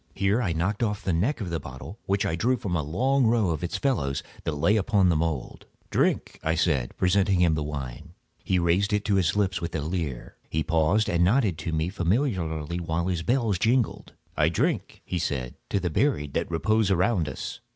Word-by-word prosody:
Here 100 +5 +2
I 100 -7 0
knocked 85 +7 -1
off 105 -3 -1
the 95 - 0
neck 110 - 0
of 90 -4 -4
a 85 - 0
bottle 65 - -9
which 100 0 +1
I 80 - 0
drew 125 +9 +1
from 95 -6 -3
a 80 - +1
long 125 - +1
row 110 -6 +2
of 80 +2 -3
its 85 - -2
fellows 70 - 0 0.2
that 80 - -1
lay 85 +9 +3
upon 100 -3 +3
the 85 - +3
mould. 80 -4 -3 0.2
"Drink," - - 0
I 80 +1 0
said, 75 -7 0
presenting 95 0 +2
him 85 -2 +4
the 80 - -1
wine. 70 -5 -6 0.3
He 95 - +1
raised 90 +4 +2
it 105 0 0
to 105 - +1
his 90 -2 +2
lips 95 -4 0
with 85 -1 -4
a 80 - -1
leer. 80 -5 -4
He 80 0 0
paused 85 +6 +2
and 85 0 +2
nodded 100 - +2
to 80 +2 -3
me 80 +2 0
familiarly, 90 - -1
while 85 +1 -1
his 90 -3 -1
bells 115 -2 +1
jingled. 120 +2 0 0.2
"I 75 +1 +3
drink," 85 - -1
he 90 - -2
said, 65 -6 -2 0.2
"to 100 - +1
the 90 -3 -2
buried 75 - 0
that - - -1
repose 110 +5 +1
around 90 -3 +2
us." - - -6
90 Hz, 210 wpm, -26 LUFS, 80-105 Hz, 0.3 s, him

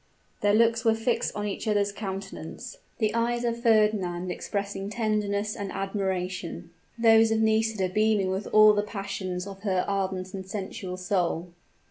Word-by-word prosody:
Their 205 0 +3
looks 230 0 +3
were 225 -2 +4
fixed 230 +1 -1
on 210 - -2
each 205 - -4
other's 205 -1 +2
countenance; 195 +2 -7 0.2
the 215 -2 +1
eyes 235 +1 0
of 235 0 -1
Fernand 210 -6 +2
expressing 200 0 -4
tenderness 210 -2 -1
and 200 -1 -5
admiration, 185 -3 -3 0.3
those 225 -1 +6
of 220 0 +1
Nisida 220 -2 +2
beaming 210 0 +2
with 190 +2 -3
all 215 0 +7
the 205 - +2
passions 195 -3 -4
of 195 -1 -9
her 190 -3 0
ardent 190 -2 -2
and 190 -1 -5
sensual 190 -1 -5
soul. 180 -2 -1
200 Hz, 150 wpm, -27 LUFS, 190-220 Hz, 0.3 s, all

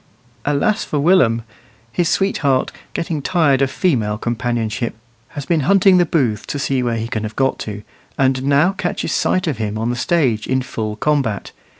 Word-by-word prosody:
Alas 145 +10 +1
for 150 - -3
Willum! 140 -8 +3 0.5
His 170 +7 0
sweetheart, 140 -9 +1 0.2
getting 165 -3 -2
tired 145 -5 +2
of 135 - +2
female 115 - 0
companionship, 120 -1 -2 0.3
has 145 -2 -7
been 170 0 +1
hunting 195 +4 +5
the 175 -1 +3
booths 120 -11 0
to - - -3
see 135 -2 0
where 120 -2 -1
he 115 0 -3
can 115 -3 -3
have 110 0 -5
got 135 0 +1
to, 105 -1 -6 0.3
and 130 -1 +2
now 140 +6 +3
catches 180 -2 -3
sight 185 - +1
of 145 -9 -2
him 105 -1 -2
on 115 +2 -1
the - - -2
stage 125 -6 +1
in 130 0 0
full 110 -4 -4
combat. 135 -6 -1
135 Hz, 180 wpm, -19 LUFS, 115-160 Hz, 0.5 s, hunting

